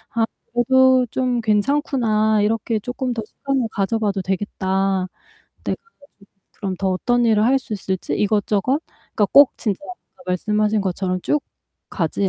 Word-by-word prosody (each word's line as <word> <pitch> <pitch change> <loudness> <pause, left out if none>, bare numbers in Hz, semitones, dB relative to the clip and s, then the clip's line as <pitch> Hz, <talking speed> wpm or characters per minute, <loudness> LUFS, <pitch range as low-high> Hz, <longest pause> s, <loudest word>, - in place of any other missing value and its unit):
'아 230 -1 +3 0.3
그래도 260 +1 +4
좀 250 -2 0
괜찮구나 220 -2 +1
이렇게 220 +1 0
쪼끔 250 +3 -3
더 225 - -4
시간을 270 +1 -2
가져봐도 205 -1 -1
되겠다.' 190 0 -1 0.6
네. - - 0
그래 460 - -23
가지고 280 -8 -22 0.3
그럼 195 -3 -3
더 195 - 0
어떤 240 +6 +1
일을 215 -2 +3
할 265 +3 +4
수 250 - -10
있을지 190 -2 -3
이것저것 210 +6 +1 0.3
그러니까 205 - +3
꼭 285 -1 +8
진짜 205 -4 -2 0.4
아까 265 - -18
말씀하신 210 +4 +1
것처럼 185 -1 -2
쭉 295 -1 0 0.5
가지 190 +2 -1
215 Hz, 320 characters per minute, -21 LUFS, 195-250 Hz, 0.6 s, 꼭